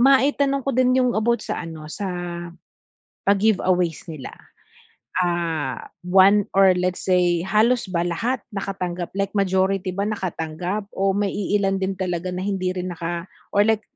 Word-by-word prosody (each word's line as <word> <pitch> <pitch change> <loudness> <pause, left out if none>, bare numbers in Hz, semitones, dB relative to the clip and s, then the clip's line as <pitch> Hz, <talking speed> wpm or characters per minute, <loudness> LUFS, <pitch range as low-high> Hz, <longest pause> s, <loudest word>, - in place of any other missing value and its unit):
ma-itanong 275 +1 +4
ko 275 - 0
din 255 +1 +3
yung 250 -1 +3
about 235 +2 +2
sa - - -3
ano 160 -2 -8
sa, 200 -2 -3 1.2
pa-give 200 0 +3
aways 180 -3 +1
nila. 145 -5 -7 0.9
Ah, 170 -7 -1 0.2
one 195 +2 +5
or 190 -2 +5
let's 180 0 -1
say 180 -2 +2
halos 215 +4 +2
ba 175 -1 0
lahat 230 +9 0 0.2
nakatanggap 185 -3 -3
like 195 +1 -1
majority 190 -1 +1
ba 200 +3 -2
nakatanggap 185 -1 -3
o 195 0 +1
may 200 0 0
iilan 195 -1 0
din 190 0 -1
talaga 180 -1 -2
na 180 +1 -3
hindi 190 -2 -1
rin 180 -1 -3
naka 170 +1 -4 0.2
or 205 +1 +3
like 220 -1 +2
190 Hz, 150 wpm, -23 LUFS, 180-205 Hz, 1.2 s, one